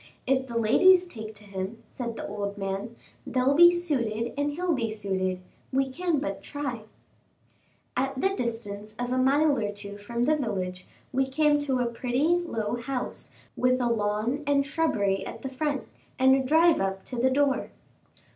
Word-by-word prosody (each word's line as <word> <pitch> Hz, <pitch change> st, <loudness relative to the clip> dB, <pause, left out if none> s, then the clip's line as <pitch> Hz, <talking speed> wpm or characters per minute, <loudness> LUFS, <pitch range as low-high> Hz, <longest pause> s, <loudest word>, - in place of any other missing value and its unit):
"If 265 Hz, 0 st, +1 dB
the 235 Hz, -2 st, -3 dB
ladies 360 Hz, +12 st, +5 dB
take 220 Hz, -10 st, -8 dB
to 205 Hz, -, -12 dB
him," 200 Hz, +3 st, -6 dB
said 235 Hz, -3 st, -4 dB
the -, -, -5 dB
old 200 Hz, -1 st, -4 dB
gentleman, 195 Hz, +3 st, -4 dB, 0.3 s
"they'll 260 Hz, +1 st, +2 dB
be 345 Hz, +4 st, +9 dB
suited 240 Hz, -10 st, -1 dB
and 290 Hz, +1 st, 0 dB
he'll 350 Hz, +2 st, 0 dB
be 235 Hz, -5 st, -1 dB
suited; 190 Hz, -3 st, -2 dB, 0.3 s
we 270 Hz, 0 st, +1 dB
can 345 Hz, +2 st, 0 dB
but 195 Hz, -8 st, -3 dB
try." 265 Hz, -7 st, -5 dB, 1.1 s
At 265 Hz, +1 st, -1 dB
the 385 Hz, -, +3 dB
distance 215 Hz, -, -4 dB
of 245 Hz, 0 st, -3 dB
a 255 Hz, -, +1 dB
mile 285 Hz, +3 st, +4 dB
or 205 Hz, -2 st, -1 dB
two 205 Hz, 0 st, -9 dB
from 235 Hz, +3 st, -2 dB
the 310 Hz, +5 st, +3 dB
village, 185 Hz, -9 st, -3 dB, 0.3 s
we 265 Hz, +1 st, +2 dB
came 295 Hz, +2 st, +3 dB
to 265 Hz, -3 st, 0 dB
a -, -, +1 dB
pretty, 245 Hz, +5 st, 0 dB
low 240 Hz, -11 st, 0 dB
house, 250 Hz, +1 st, -4 dB, 0.2 s
with 255 Hz, 0 st, +2 dB
a 245 Hz, -1 st, +1 dB
lawn 215 Hz, +4 st, 0 dB
and 280 Hz, -1 st, +3 dB
shrubbery 220 Hz, -11 st, 0 dB
at -, -, -8 dB
the 265 Hz, -, -3 dB
front, 285 Hz, +1 st, -2 dB, 0.3 s
and 265 Hz, +1 st, +6 dB
a 270 Hz, -, +2 dB
drive 320 Hz, -, +4 dB
up 195 Hz, 0 st, -2 dB
to 255 Hz, -, -6 dB
the 255 Hz, +2 st, +3 dB
door. 275 Hz, 0 st, +1 dB
250 Hz, 175 wpm, -27 LUFS, 215-285 Hz, 1.1 s, be